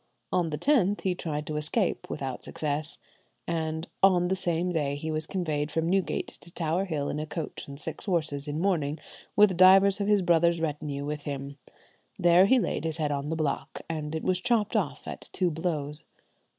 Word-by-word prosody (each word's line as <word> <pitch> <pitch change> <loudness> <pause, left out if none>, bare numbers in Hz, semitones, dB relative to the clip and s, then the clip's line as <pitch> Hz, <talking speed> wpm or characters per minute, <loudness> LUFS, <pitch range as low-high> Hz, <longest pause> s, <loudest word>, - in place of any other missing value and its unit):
On 175 -2 +2
the 150 - -3
10th 210 - +2
he 185 - +1
tried 155 -4 -4
to 150 - -3
escape, 165 +7 0
without 135 -3 -4
success, 150 +1 -2 0.5
and 160 0 -2
on 180 -2 +5
the 190 - +2
same 175 -1 0
day 145 -4 0
he 155 +2 -4
was 155 0 -2
conveyed 155 -6 -1
from 160 +2 -1
Newgate 180 -3 0
to 170 - -11
Tower 170 +3 0
Hill 150 -6 -2
in 150 - -2
a 155 - -4
coach 150 +1 -5
and 140 0 -8
six 140 - -6
horses 155 -7 0
in 145 +1 -2
mourning, 160 -6 0 0.4
with 205 -3 +6
divers 195 +2 +6
of 200 - 0
his 205 -2 +4
brother's 170 0 +3
retinue 150 -3 -3
with 150 0 -4
him. 140 0 -5 0.6
There 175 +2 +6
he 260 - +5
laid 235 - -1
his 160 -1 -2
head 150 -2 0
on 140 0 -2
the 160 - -1
block, 150 -2 -2
and 155 -1 -4
it 160 - -3
was 185 -1 +1
chopped 225 -1 +1
off 145 -10 -1
at - - -7
two 180 -2 +1
blows. 155 -2 -3
160 Hz, 195 wpm, -28 LUFS, 150-180 Hz, 0.6 s, with